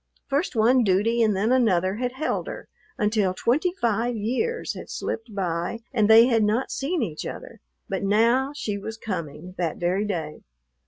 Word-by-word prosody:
First 285 +2 -1
one 240 +3 +4
duty 215 +4 +2
and 215 -3 +3
then 210 +5 +1
another 195 -7 +2
had 250 +1 -2
held 290 +4 -2
her, - - -7 0.3
until 210 -5 +1
twenty 295 - +1
five 235 +1 0
years 255 - -1
had - - -9
slipped 225 -2 -5
by 175 +3 -2
and 215 -4 +2
they 225 +1 +9
had 230 -3 +3
not 220 +5 0
seen 300 +1 -1
each 160 -7 -4
other, - - -8 0.3
but - - -3
now 230 +7 +3
she 205 -7 -3
was 220 +3 -6
coming, 175 -5 -6
that 170 -3 -1
very 185 +4 0
day. 160 -6 -4
220 Hz, 170 wpm, -25 LUFS, 190-245 Hz, 0.3 s, they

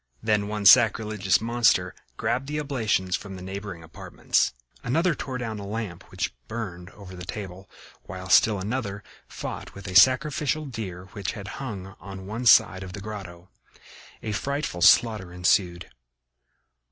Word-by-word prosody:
Then 105 -2 +1
one 105 -1 -4
sacrilegious 105 -3 +5
monster 115 -6 +2 0.2
grabbed 120 +4 -1
the 150 +1 -2
oblations 110 -10 0
from 100 -2 -7
the 90 - -9
neighboring 95 -2 -7
apartments. 80 - -1 0.3
Another 165 +8 +2
tore 130 -3 -5
down 115 -3 -4
the 100 - -7
lamp 100 -3 -5
which - - -3
burned 95 -6 -6
over 95 -2 -12
the 90 - -8
table, 95 0 -7 0.4
while 95 +1 -7
still 105 +3 +5
another 100 -1 -3 0.2
fought - - -7
with 100 0 -9
a 90 - -5
sacrificial 145 +6 +4
deer 95 -9 -6
which 100 -5 -4
had 100 -2 -8
hung 100 -6 -6
on 95 -1 -9
one 115 +5 -3
side 95 -4 +6
of 95 -1 -8
the 100 - -6
grotto. 95 -4 -8 0.7
A 110 - -3
frightful 140 -4 -3
slaughter 105 0 +5
ensued. 90 0 +1
100 Hz, 150 wpm, -25 LUFS, 95-115 Hz, 0.7 s, side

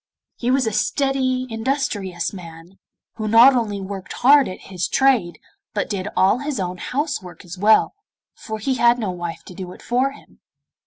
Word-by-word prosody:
He 240 - -3
was 260 0 +2
a 220 - 0
steady 260 +1 0
industrious 225 -8 -2
man, 170 0 -12 0.4
who 215 -1 -3
not 235 +5 +7
only 215 -4 -1
worked 195 -1 -7
hard 280 +2 +5
at 185 - -8
his 185 -2 -4
trade, 250 -11 +2 0.4
but - - -2
did 195 -1 -3
all 195 +6 +4
his 285 -3 -3
own 180 -1 -3
house 290 - -2
work 180 -2 -12
as 175 +1 -8
well, 210 +4 +4 0.4
for 220 -1 -7
he 240 +5 -1
had 235 +1 +4
no 215 -6 -2
wife 175 -2 -6
to - - -12
do 180 0 -8
it - - -15
for 255 +3 0
him. - - -19
220 Hz, 180 wpm, -21 LUFS, 185-260 Hz, 0.4 s, not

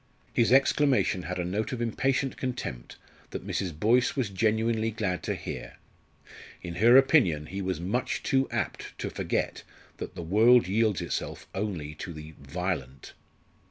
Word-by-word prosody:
His 115 0 +3
exclamation 135 -6 +3
had 90 0 -4
a 90 - -2
note 105 +9 -2
of 125 - -3
impatient 130 +3 0
contempt 125 - -5 0.3
that - - -6
Mrs. 85 -6 -3
Boyce 120 +5 +3
was 125 -8 -1
genuinely 110 +2 +1
glad 105 -5 -2
to - - -2
hear. - - -7 0.9
In 85 -1 -6
her 120 +6 +7
opinion 120 - +4
he 95 +5 -5
was 95 -4 -2
much 100 +9 -2
too 135 0 +1
apt - - -4
to - - -4
forget - - -2 0.4
that - - -7
the 85 - -5
world 110 +5 +5
yields 105 -1 +1
itself 85 - -4
only 90 -7 -3
to 85 +3 -7
the 75 0 -10
"violent." 70 -3 -4
105 Hz, 155 wpm, -28 LUFS, 90-120 Hz, 0.9 s, her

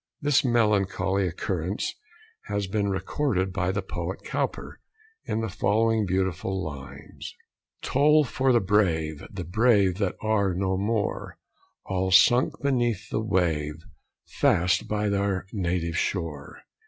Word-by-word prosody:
This 145 -1 +3
melancholy 100 -5 +1
occurrence 90 +2 -3 0.5
has 100 0 -2
been 100 +1 -1
recorded 95 0 -1
by 90 -1 0
the - - -2
poet - - -5
Cowper, - - -3 0.5
in 110 - -2
the 110 - -2
following 110 +1 +1
beautiful 95 0 -1
lines: 70 -3 -9 0.5
Toll 150 +3 +4
for 130 +1 +1
the 120 - +5
brave! 85 -7 +1
The 95 -3 -6
brave, 100 0 +2
that 100 -4 0
are 100 -4 +1
no 95 0 0
more: 105 +2 -2 0.5
All 95 0 -1
sunk 110 +10 +4
beneath 120 -6 0
the - - 0
wave, 85 -8 0 0.5
Fast 90 +2 +1
by 105 0 -1
their 100 -2 0
native 85 -3 -1
shore. 80 -7 -4
100 Hz, 125 wpm, -26 LUFS, 90-110 Hz, 0.5 s, the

